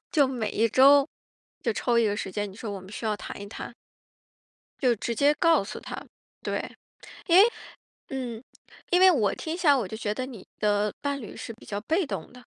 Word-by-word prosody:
就 295 -7 +4
每 245 -5 -2
一 225 +2 +3
周 275 +4 +6 0.6
就 235 - +1
抽 235 +1 +1
一 230 - +4
个 205 0 0
时 190 - -4
间， 205 0 -3
你 190 - -14
说 225 -1 -5
我 195 - -6
们 185 - -13
需 220 - -7
要 215 -1 +1
谈 205 - -8
一 200 - -7
谈。 225 - -7 1.1
就 250 -4 +3
直 235 +3 -3
接 285 +5 +4
告 330 - +4
诉 195 - -7
他。 - - -7 0.4
对， - - -4 0.5
因 350 +1 +6
为 425 - +8 0.6
嗯， 245 -3 -4 0.5
因 360 - +4
为 375 0 +8
我 220 - +2
听 320 - -4
起 355 - -3
来 290 - +8
我 240 -6 -1
就 220 - -6
觉 210 -1 -2
得 255 - -3
你 230 -8 -10
的 210 -1 +1
伴 280 -1 -2
侣 220 - -9
是 - - -6
比 225 - -17
较 205 0 -3
被 330 - +1
动 195 -8 -6
的， 250 0 -14
235 Hz, 235 characters per minute, -27 LUFS, 210-280 Hz, 1.1 s, 为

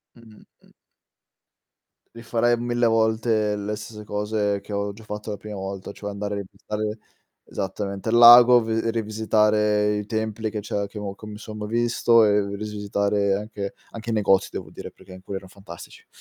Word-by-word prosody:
Mh-mh, 115 -2 -17 0.2
mh. - - -23 1.4
Rifarei 115 +1 0
1000 120 0 0
volte 110 -1 +1
le 105 +1 -3
stesse 105 0 -9
cose 105 -1 -1
che 105 - -10
ho 100 0 -2
già 110 +2 -14
fatto 105 0 -6
la 105 - -3
prima 105 0 -8
volta, 95 0 -6
cioè 105 0 -7
andare 100 0 -4
a - - -3
visitare 105 +1 -5 0.5
esattamente, 100 +2 -4
il 120 - +3
lago, 120 0 +9
v 110 - -7 0.2
rivisitare 105 -1 +1
i 105 -1 -4
templi 110 0 -2
che 105 0 -4
c'è 100 0 -3
che 105 +1 -9
ho 100 -1 -5
co 110 - -12
mi 105 -1 -8
son 110 -1 -9
ma 105 - -4
visto 115 0 +3
e 100 -1 +1
rivisitare 100 -1 -1
anche 100 -1 -5 0.2
anche 115 0 -7
i - - 0
negozi 100 -3 +3
devo - - -6
dire, - - -9
perché 95 - -16
in 95 0 -12
cui 100 - -7
erano 95 -1 -6
fantastici. 95 -3 -12
105 Hz, 180 wpm, -24 LUFS, 100-110 Hz, 1.4 s, lago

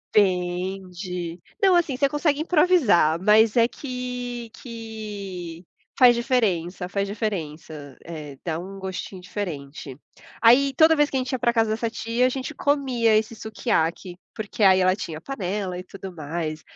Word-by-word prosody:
Vende, 180 -2 -1 0.2
não, 385 -3 +5
assim, 335 -6 +2
você 280 +1 +3
consegue 295 0 0
improvisar, 300 - +4
mas 215 +3 +5
é 230 0 +6
que 250 -2 -5
que 205 -7 -7 0.3
faz 245 -2 +8
diferença, 195 - 0
faz 200 +1 -2
diferença, 160 - -5
eh, 150 -4 -8
dá 160 -2 -1
um 195 +3 -8
gostinho 190 0 -6
diferente. 150 -8 -6 0.4
Aí 260 +4 +6
toda 320 +2 +6
vez 295 -1 +3
que 270 - -1
a - - +2
gente 255 +1 -3
ia 260 - 0
pra 240 -1 +2
casa 225 -2 +2
dessa 225 +1 -1
tia, 230 +2 0
a - - +4
gente 265 +3 -4
comia 255 -6 +2
esse 220 +1 -2
Sukiyaki, 185 -5 -2 0.2
porque 215 0 -6
aí 190 -1 +7
ela 185 0 +3
tinha 165 -6 -6
a - - -11
panela 195 -5 -3
e 180 - -6
tudo 195 +1 -9
mais. 155 0 -4
205 Hz, 160 wpm, -24 LUFS, 180-245 Hz, 0.4 s, faz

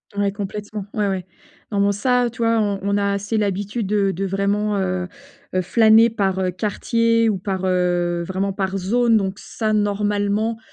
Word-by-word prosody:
Ouais 200 -1 +1
complètement, 205 0 -6
ouais 210 -1 0
ouais. 190 -2 -2 0.5
Non, 205 - 0
bon 200 0 +3
ça, 250 +4 +1
heu, - - -3
tu 230 0 -5
vois, 230 0 +3
on 200 -2 0
on 200 +1 +1
a 200 0 +1
assez 200 +3 -3
l'habitude 205 +1 -1
de 200 -1 +1
de 195 +3 -3
vraiment, 200 +2 0
heu, 185 -1 -1 0.5
heu 185 - +3
flâner 220 +3 +5
par, 195 -4 0
heu, 185 -1 0
quartier 230 +4 +1
ou 195 - -1
par, 190 0 -3
heu 175 -1 +1
vraiment 190 +2 -2
par 195 0 -2
zone 230 +4 +2
donc 195 -1 -2
ça, 215 -2 -2
normalement, 205 +1 0
200 Hz, 185 wpm, -21 LUFS, 190-215 Hz, 0.5 s, flâner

